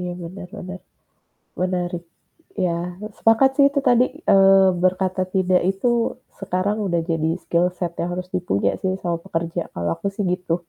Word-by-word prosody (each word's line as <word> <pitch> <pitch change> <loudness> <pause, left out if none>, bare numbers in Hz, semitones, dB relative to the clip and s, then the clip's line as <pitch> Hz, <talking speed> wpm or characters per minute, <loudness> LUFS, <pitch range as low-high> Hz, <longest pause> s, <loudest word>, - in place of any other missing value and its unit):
Iya 180 0 -3
bener 180 +2 -8
bener, 185 -1 -7 0.8
menarik, 180 -1 -1 0.6
ya 170 -1 0 0.4
sepakat 225 +4 +4
sih 280 - +6
itu 280 - 0
tadi, 245 0 +5 0.3
eee, 195 0 +7 0.2
berkata 185 0 +1
tidak 185 -1 +3
itu 195 +6 -1 0.5
sekarang 195 +2 -1
udah 170 -2 +1
jadi 160 -1 0
skill 170 +1 +2
set 175 -2 -2
yang 175 - -2
harus 180 0 -5
dipuja 175 - +1
sih 190 - +1
sama 170 -1 0
pekerja 170 -2 -2
kalau 85 -1 -2
aku - - -6
sih 205 - -1
gitu. 180 -2 -2
180 Hz, 155 wpm, -22 LUFS, 175-195 Hz, 0.8 s, eee